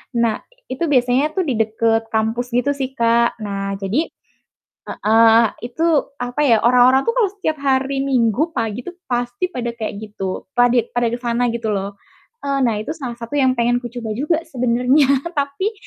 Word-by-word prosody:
Nah, 230 -2 0 0.2
itu 260 +6 -4
biasanya 255 +3 +2
tuh 380 - +1
di 260 - 0
deket 225 +1 0
kampus 225 +3 -1
gitu 245 +4 +1
sih 265 -1 -3
Kak. 235 -2 +1
Nah, 200 -2 -3
jadi 215 - -1 0.8
heeh, 225 +1 +4 0.2
itu 245 +7 -6 0.4
apa 245 +4 -3
ya, 230 -4 +4
orang-orang 250 +2 +5
tuh 465 - -1
kalau 410 -5 +3
setiap 315 -6 -2
hari 270 0 0
minggu 260 +4 +1
pagi 230 0 -3
tuh 360 - -7 0.2
pasti 245 +8 -1
pada 240 -6 -4
kayak 220 -3 -4
gitu. 200 -3 -6
Padit 245 -1 +3
pada 240 -1 +1
ke 240 - -3
sana 240 0 0
gitu 230 -1 -3
loh. 200 +1 -3 0.5
Eee, 275 0 0
nah 235 -3 +2
itu 215 +8 -4
salah 255 -7 -6
satu 235 +1 -9
yang 260 -3 +3
pengen 240 +1 +2
kucoba 240 -2 -6
juga 300 +7 0
sebenarnya, 250 +3 +2 0.3
tapi 285 +9 -1
245 Hz, 170 wpm, -19 LUFS, 225-270 Hz, 0.8 s, orang-orang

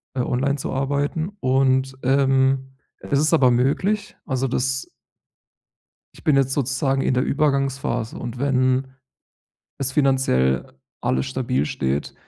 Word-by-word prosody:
äh, 130 - 0
online 135 +3 0
zu 145 - -4
arbeiten. 145 +5 -1
Und, 130 0 +1
ähm, 135 0 +2 0.3
es 140 - -1
ist 155 +2 +2
aber 130 -6 +5
möglich, 190 - 0
also, 130 -1 -1
das 130 +1 -1 1.3
Ich - - -17
bin 150 -3 +4
jetzt 135 -1 +2
sozusagen 135 0 0
in - - +1
der 125 - +2
Übergangsphase. 135 -5 0
Und 120 0 -6
wenn 130 -1 +1 0.9
es 135 -1 -2
finanziell 130 - +1 0.3
alles 65 +1 0
stabil 65 +1 -1
steht, 70 0 -2
135 Hz, 125 wpm, -22 LUFS, 125-140 Hz, 1.3 s, aber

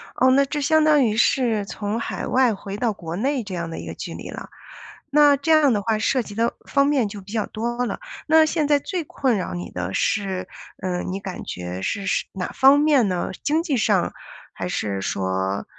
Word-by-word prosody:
哦， 260 0 +4
那 275 +2 +5
这 295 +2 -3
相 315 +2 +3
当 300 -2 +5
于 215 -2 0
是 230 -3 +2
从 205 +2 -3
海 - - -4
外 255 -3 +3
回 195 0 -7
到 230 +1 +1
国 165 -3 -6
内 260 +5 0
这 195 -3 -6
样 170 -1 -4
的 165 - -6
一 - - -7
个 - - -5
距 - - -7
离 - - -8
了。 - - -8 0.6
那 290 0 +6
这 285 +4 -1
样 310 -3 +5
的 205 - 0
话， 220 +1 0
涉 250 +4 +1
及 205 -3 -9
的 230 +2 +1
方 280 -1 +3
面 280 -6 +2
就 205 0 -8
比 195 +2 -13
较 220 -3 -1
多 240 +2 -2
了。 - - -4 0.3
那 315 0 +6
现 310 -2 0
在 290 - +4
最 350 +3 -3
困 260 -5 0
扰 180 - -3
你 90 0 -6
的 90 +1 -4
是 190 - -1 0.4
呃， 180 -1 -1
你 190 +1 -4
感 190 -2 -7
觉 90 +1 -5
是 200 - -2
是 - - 0
哪 185 -2 -3
方 275 +2 +6
面 290 -7 +4
呢？ 185 0 -2
经 315 +3 +1
济 300 -7 0
上， 205 -6 +1 0.4
还 - - -4
是 100 -2 -2
说， 95 0 -2
220 Hz, 235 characters per minute, -23 LUFS, 185-280 Hz, 0.6 s, 那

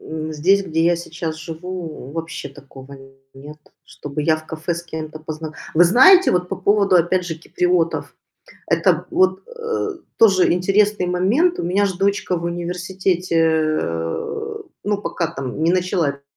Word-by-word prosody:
м, 155 0 -5
здесь, 185 +7 +3
где 160 -2 0
я 175 - +4
сейчас 165 -1 -5
живу, 160 -3 -7
вообще 165 -3 -5
такого 140 0 -13 0.4
нет. 145 +3 -11 0.3
Чтобы 145 +1 -6
я 155 +1 +3
в 155 0 -12
кафе 160 +2 -3
с 170 - -6
кем-то 155 -2 -7
позна 155 0 -7 0.2
Вы 165 - +6
знаете, 310 - +7
вот 180 0 0
по - - -2
поводу, 200 0 +3
опять 175 +1 +1
же, 165 - -3
киприотов. 170 +1 -1 0.5
Это - - +2
вот, 185 0 +1
э, 465 -2 -3 0.3
тоже 195 -5 +5
интересный 195 +2 +2
момент. 220 - +2
У - - -2
меня 195 +4 +2
ж 190 - -3
дочка 195 -1 0
в 170 - -5
университете, 180 +1 -2
э, 160 - -1 0.2
ну, 205 0 0
пока 170 -5 -2
там 135 -1 -5
не 165 +2 +3
начала 180 -5 +1
п 140 0 -17
175 Hz, 160 wpm, -20 LUFS, 155-190 Hz, 0.5 s, знаете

